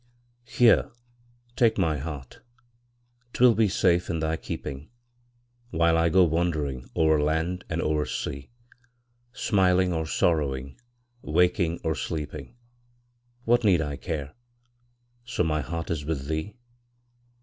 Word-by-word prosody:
Here, 120 -3 +4 0.7
take 115 -2 +3
my 80 -6 +1
heart 70 -3 -8 0.9
'twill 125 -1 +5
be 110 0 +3
safe 90 -1 +2
in 85 - -1
thy 80 0 -1
keeping, 70 -2 -7 0.8
While 85 -4 +2
I 80 0 +3
go 95 +3 +5
wandering 75 -6 -1
o'er 80 -2 +3
land 80 +4 -1
and 85 0 -1
o'er 75 -1 0
sea; 70 0 -5 0.8
Smiling 95 -6 +2
or 80 -1 -2
sorrowing, 70 - 0 0.4
waking 85 +1 +1
or 80 -1 0
sleeping, 75 - -5 0.9
What 120 +1 +3
need 95 -5 +4
I 75 -1 -4
care, 75 -2 -5 0.9
so 120 -6 -1
my 75 -2 0
heart 80 +5 -5
is 75 -3 -2
with 70 -3 -3
thee? 80 +6 -3
80 Hz, 120 wpm, -26 LUFS, 75-90 Hz, 0.9 s, twill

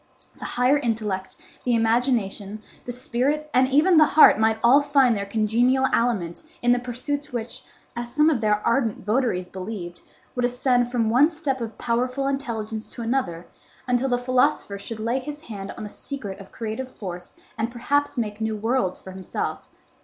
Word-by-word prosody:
The - - -6
higher 255 +4 +2
intellect, 215 -6 -2 0.3
the 245 -1 +2
imagination, 225 -3 0 0.2
the 245 - -4
spirit, 265 +5 -1
and 255 +1 +4
even 310 +6 +4
the 310 - +8
heart 305 -8 +7
might 220 0 +3
all 260 +5 +7
find 275 -4 +3
their 200 -1 -3
congenial 235 +5 +2
aliment 200 -8 0 0.2
in 245 0 +5
pursuits 280 +4 -4
which, 235 -1 -5 0.3
as 240 0 -5
some 300 +3 +3
of 290 -8 +2
their 210 -1 +1
ardent 235 -4 +1
votaries 215 -5 0
believed, 185 -2 -7 0.3
would 250 - -2
ascend 245 0 +2
from 230 -3 +1
one 270 +7 +5
step 295 -6 -3
of 225 -2 -5
powerful 250 +3 -1
intelligence 225 -5 -3
to 235 - -7
another, 225 -9 -1 0.4
until 250 +2 +1
the 245 - +2
philosopher 245 -5 +1
should 220 +2 -6
lay 235 +4 0
his 295 +3 -8
hand 200 -6 -7
on 220 - -6
the 210 - -6
secret 210 -9 -7
of 195 - -12
creative 235 +3 -5
force 180 -5 -8 0.2
and 225 +1 -1
perhaps 275 +4 0
make 215 -2 -3
new 220 0 -1
worlds 225 -3 0
for 190 - -10
himself. 190 0 -5
240 Hz, 170 wpm, -24 LUFS, 215-260 Hz, 0.4 s, the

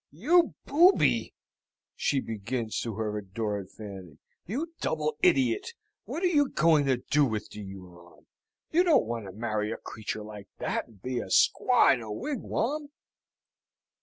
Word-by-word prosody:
"You 315 - +3
booby!" 345 +7 +4 0.6
she 140 -2 +1
begins 115 +1 -3
to 115 -3 -4
her 105 -1 -2
adored 100 -1 -4
Fanny. 95 -7 -10 0.3
"You 300 - -3
double 155 -1 -1
idiot! 130 - +2 0.3
What 340 - -5
are - - +4
you 295 -6 +3
going 155 -3 +3
to 130 -2 +3
do 150 +4 +2
with 110 -5 -2
the 105 - -8
Huron? 90 -3 -12 0.5
You 345 +3 +4
don't 335 - +4
want 115 -1 -4
to - - -7
marry 110 0 -2
a - - -3
creature 110 -1 -6
like 105 -1 -10
that, - - -2
and 105 -5 -21
be 125 -1 -2
a - - -5
squaw 250 -1 +4
in 125 - -3
a 110 -2 -7
wigwam?" 285 - -2
120 Hz, 155 wpm, -28 LUFS, -, 0.6 s, booby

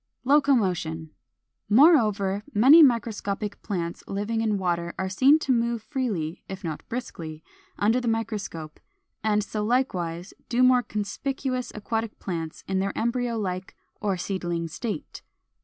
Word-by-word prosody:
] - - -55
460. 270 +3 +2 0.2
=Locomotion.= 165 -6 -2 0.6
Moreover, 210 - +4
many 270 +10 +8
microscopic 215 -5 +1
plants 170 -5 -4
living 210 +3 -2
in 215 -2 +1
water 170 -2 -1
are 190 - -2
seen 265 +10 +5
to 295 -4 -1
move 235 -2 +1
freely, 205 - -3
if 190 +1 -7
not 160 -3 -4
briskly, 165 -10 -6 0.3
under 225 +5 +2
the 245 - -3
microscope; 210 -9 -3 0.4
and 210 -1 +2
so 210 0 -3
likewise 185 -8 -1 0.2
do 245 +1 +3
more 255 -1 +6
conspicuous 255 +4 -3
aquatic 220 +1 -3
plants 165 -4 -5
in 190 0 0
their 195 +1 -2
embryo 235 0 0
like 185 -3 -4 0.3
or 200 -3 0
seedling 175 -2 -2
state. 230 - -5
210 Hz, 140 wpm, -26 LUFS, 180-235 Hz, 0.6 s, many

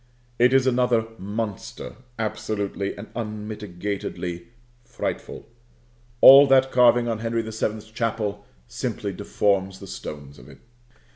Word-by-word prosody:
It 125 +1 +5
is 135 -1 +4
another 125 -3 +2
monster, 110 +3 -5 0.2
absolutely 105 -2 -3
and 100 - -9
unmitigatedly 105 -5 -5 0.4
frightful. 120 0 -5 0.7
All 140 +2 +10
that 135 0 +4
carving 120 -1 +5
on 115 -2 -2
Henry 115 0 -1
the 110 - -7
Seventh's 110 0 -3
Chapel 110 -3 -2 0.2
simply - - -4
deforms 95 -2 0
the 100 - -10
stones 75 -6 -8
of 60 +3 -15
it. 70 - -14
110 Hz, 120 wpm, -24 LUFS, 100-120 Hz, 0.7 s, All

